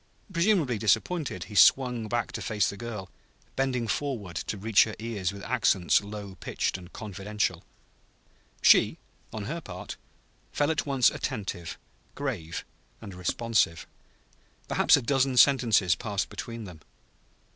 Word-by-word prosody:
Presumably 170 - +2
disappointed, 110 - 0
he 105 - -11
swung 120 +3 +4
back 120 +2 -1
to - - -5
face 105 -3 0
the - - -8
girl, 105 -5 -7 0.4
bending 130 -3 0
forward 110 - -3
to 105 - -3
reach 105 +1 +4
her 110 - -6
ears 105 -5 -3
with 100 0 -10
accents 90 -4 +2
low 100 -1 -8
pitched - - -2
and 90 -1 -9
confidential. 100 -3 -3 1.0
She, - - +6 0.3
on 110 - -5
her 165 +9 -4
part, - - -8 0.5
fell 145 +2 +1
at 155 - -2
once 135 -3 +4
attentive, 85 -5 -4 0.4
grave 100 - -4 0.3
and 100 -4 -9
responsive. 90 0 0 0.8
Perhaps - - +4
a 140 - -3
dozen 135 0 +1
sentences 120 - +5
passed 100 +3 -3
between 115 -1 -7
them. 90 -6 -10
110 Hz, 135 wpm, -28 LUFS, 95-130 Hz, 1.0 s, She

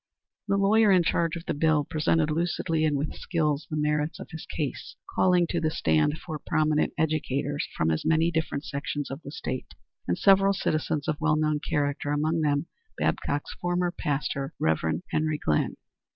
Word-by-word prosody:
The 200 0 +2
lawyer 210 +2 +4
in 185 -2 +5
charge 170 0 +1
of 170 0 -7
the - - -1
bill 150 0 +2
presented 155 +1 +1
lucidly 165 0 0
and 150 -2 +1
with 145 +2 -2
skill 150 -5 0
the 155 - -2
merits 150 +1 0
of - - -9
his 160 -1 -8
case, 150 -4 -4 0.2
calling 180 -2 +4
to 170 - 0
the 160 - +2
stand 80 - +1
four 155 -3 -6
prominent 155 +1 +1
educators 145 -2 -1
from 80 0 +2
as 80 - -1
many 160 +1 +3
different 160 -3 -2
sections 140 0 -4
of 135 +3 -6
the - - -9
State, 130 -3 -5 0.3
and 85 - +1
several 195 0 +5
citizens 155 -5 -1
of 155 +1 -1
well 155 -1 +3
known 155 -1 +1
character, 145 -2 -1
among 155 +3 +1
them 145 0 +1 0.3
Babcock's 145 +1 -1
former 175 0 0
pastor, 140 -2 -2
Rev. 80 - 0
Henry 155 0 +1
Glynn. 75 - 0
155 Hz, 175 wpm, -27 LUFS, 145-165 Hz, 0.3 s, in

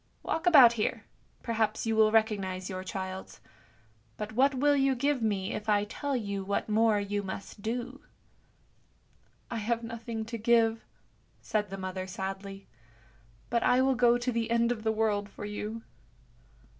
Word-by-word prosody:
Walk 325 +3 -2
about 265 -9 +8
here, 220 -2 -2 0.4
perhaps 220 -2 -1
you 225 0 0
will 215 -1 +5
recognise 200 -4 0
your 185 0 -5
child's; 190 0 -6 0.8
but 210 0 -5
what 270 +4 +3
will 290 +2 +3
you 270 -1 +2
give 280 +1 0
me 200 -3 -1
if 215 +1 -5
I 205 -1 +3
tell 280 +6 -3
you 200 -5 -3
what 200 +1 -2
more 215 0 +3
you 205 0 -2
must 200 +1 -7
do? 245 +5 -4 0.5
" - - -38
" - - -32
I 235 - -2
have 230 +2 -1
nothing 230 -1 -5
to 230 +1 -6
give," 225 0 +3 0.6
said 210 -2 -2
the 195 - -6
mother 185 0 -5
sadly, 195 +1 -6 0.4
" 115 0 -31
but 235 0 +2
I 250 - +3
will 265 0 +3
go 240 -1 +4
to 245 +1 -2
the 230 -1 -1
end 235 0 +2
of 235 -3 -3
the 220 0 +1
world 210 -2 0
for 205 - -8
you." 210 +2 -5
220 Hz, 170 wpm, -29 LUFS, 200-235 Hz, 0.8 s, about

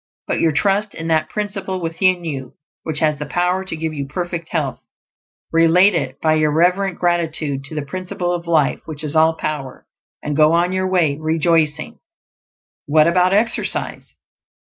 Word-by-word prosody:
Put - - -1
your 165 - +3
trust 200 +6 0
in 165 0 -5
that 160 -1 +1
Principle 195 -3 -4
within 175 +1 +1
you 135 -5 -5 0.3
which 155 -2 -1
has 155 -2 +1
the 150 - -5
power 180 +2 0
to 190 - -5
give 160 0 -3
you 140 -2 -4
perfect 170 +2 -4
health; 150 -5 -2 0.7
relate 165 +4 +5
It 135 -5 -2
by 155 -1 +2
your 155 -1 +2
reverent 180 +4 +1
gratitude 160 -5 -1
to 155 - -8
the 150 - -2
Principle 180 +2 -4
of 175 -1 -4
Life 155 -4 +2
which 155 -1 -6
is 150 0 -4
All 160 +1 +4
Power, 145 -5 -5 0.4
and 150 -1 -2
go 155 +1 +5
on 175 +2 +2
your 185 0 0
way 160 -6 +1
rejoicing. 160 +3 0 0.9
What 155 +1 +4
about 180 +2 +3
exercise? 220 +4 -1
165 Hz, 165 wpm, -19 LUFS, 155-180 Hz, 0.9 s, relate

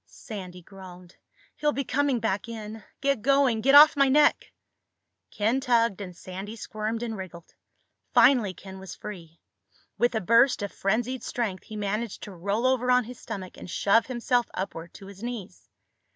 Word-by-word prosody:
Sandy 185 -5 -9
groaned. 185 -1 -13 0.4
"He'll 295 0 +1
be 275 - -2
coming 275 -1 0
back 215 0 -2
in! 220 -1 -7 0.2
Get 275 -4 +1
going! 270 -3 +3
Get 275 +4 +4
off 300 +2 +9
my 275 -1 +4
neck!" 295 +2 +3 0.8
Ken 220 +5 0
tugged 230 -5 +2
and 180 -3 -8
Sandy 190 +5 -7
squirmed 220 +1 -4
and 225 -2 -3
wriggled. 180 -4 -10 0.6
Finally 220 -9 +4
Ken 190 -1 -11
was 190 -1 -9
free. 170 -6 -10 0.6
With 240 0 +2
a - - +2
burst 230 +4 +4
of 200 - -4
frenzied 240 +5 -1
strength 215 -6 -3
he 215 - -9
managed 210 +1 -3
to 205 - -8
roll 200 +6 -2
over 255 -1 +2
on 250 0 +4
his 245 +2 -10
stomach 195 -5 -7
and - - -10
shove 205 +6 +2
himself 245 -1 0
upward 170 -3 -5
to 195 - -11
his 195 0 -12
knees. 235 -5 -7
220 Hz, 165 wpm, -26 LUFS, 195-250 Hz, 0.8 s, off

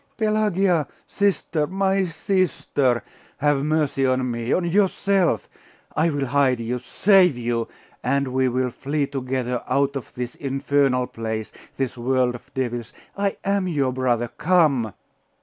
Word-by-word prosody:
'Pelagia! 200 - +2 0.2
Sister! 175 -6 0
My 195 +1 +1
sister! 165 -8 0 0.3
Have 145 -1 +2
mercy 150 -3 +1
on 130 -1 +1
me! 115 +1 -3
on 180 - +2
yourself! 195 0 +2 0.5
I 160 +2 +3
will 145 -3 -1
hide 130 -1 +2
you! 120 +2 -2
save 180 - +4
you! 120 -1 -1 0.4
and 140 +2 +1
we 130 0 +1
will 125 0 0
flee 140 +4 -1
together 130 -3 -2
out 140 0 +1
of 135 - -6
this 125 -1 -4
infernal 135 -2 +1
place! 110 -2 -5 0.3
this 130 -2 -2
world 125 0 +1
of 120 - -11
devils! 120 -3 -3 0.2
I 200 0 -1
am 200 -1 +1
your 140 -7 0
brother! 120 -2 0
Come! 150 - +3
135 Hz, 135 wpm, -23 LUFS, 125-175 Hz, 0.5 s, save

